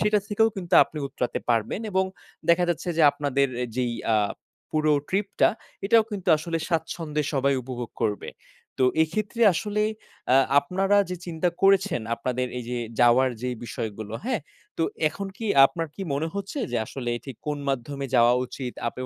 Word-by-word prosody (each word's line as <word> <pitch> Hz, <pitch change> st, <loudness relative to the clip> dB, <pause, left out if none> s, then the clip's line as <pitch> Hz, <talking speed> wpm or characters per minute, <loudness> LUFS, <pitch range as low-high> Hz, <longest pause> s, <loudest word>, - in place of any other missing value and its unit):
সেটা 210 Hz, 0 st, +3 dB
থেকেও 220 Hz, +2 st, +3 dB
কিন্তু 180 Hz, -3 st, -1 dB
আপনি 150 Hz, +2 st, -9 dB
উতঠতে 125 Hz, -2 st, -3 dB
পারবেন। 115 Hz, -, 0 dB
এবং 190 Hz, 0 st, +2 dB, 0.4 s
দেখা 175 Hz, +1 st, +5 dB
যাচ্ছে 175 Hz, +1 st, -2 dB
যে 165 Hz, -, +3 dB
আপনাদের 140 Hz, -1 st, +1 dB, 0.3 s
যেই 125 Hz, -2 st, 0 dB, 0.2 s
আ -, -, +5 dB, 0.5 s
পুরো 155 Hz, -1 st, +2 dB, 0.2 s
ট্রিপ-টা 195 Hz, +1 st, +2 dB, 0.4 s
এটাও 225 Hz, +1 st, +5 dB
কিন্তু 200 Hz, -3 st, -4 dB
আসলে 165 Hz, +1 st, -3 dB
স্বাচ্ছন্দে 160 Hz, -2 st, -1 dB
সবাই 140 Hz, -1 st, +2 dB
উপভোগ 125 Hz, -2 st, -6 dB
করবে। 105 Hz, -2 st, -1 dB, 0.5 s
তো 130 Hz, -, +4 dB, 0.2 s
এক্ষেত্রে 215 Hz, +8 st, -2 dB
আসলে 210 Hz, +3 st, -1 dB, 0.5 s
আ -, -, +7 dB, 0.2 s
আপনারা 195 Hz, +7 st, +1 dB
যে 180 Hz, -, -2 dB
চিন্তা 170 Hz, +1 st, 0 dB
করেছেন 195 Hz, -9 st, +4 dB
আপনাদের 125 Hz, +2 st, -2 dB
এই 120 Hz, -, -6 dB
যে 125 Hz, -, -1 dB, 0.2 s
যাওয়ার 125 Hz, +2 st, +5 dB
যে 125 Hz, -, -1 dB
বিষয়গুলো, 110 Hz, -2 st, -5 dB
হ্যাঁ? 250 Hz, -7 st, 0 dB, 0.4 s
তো -, -, +2 dB, 0.3 s
এখন 195 Hz, +6 st, -6 dB
কি 225 Hz, -, -5 dB, 0.2 s
আপনার 165 Hz, +4 st, -4 dB
কি 195 Hz, -, -6 dB
মনে 160 Hz, +3 st, -1 dB
হচ্ছে 200 Hz, +8 st, -4 dB
যে -, -, +1 dB
আসলে 125 Hz, -3 st, -5 dB
এটি 135 Hz, -, -9 dB, 0.2 s
কোন 150 Hz, -1 st, -1 dB
মাধ্যমে 135 Hz, +1 st, -2 dB
যাওয়া 120 Hz, 0 st, +6 dB
উচিত? 125 Hz, -1 st, -6 dB
আপ -, -, -2 dB
155 Hz, 165 wpm, -25 LUFS, 125-190 Hz, 0.5 s, আ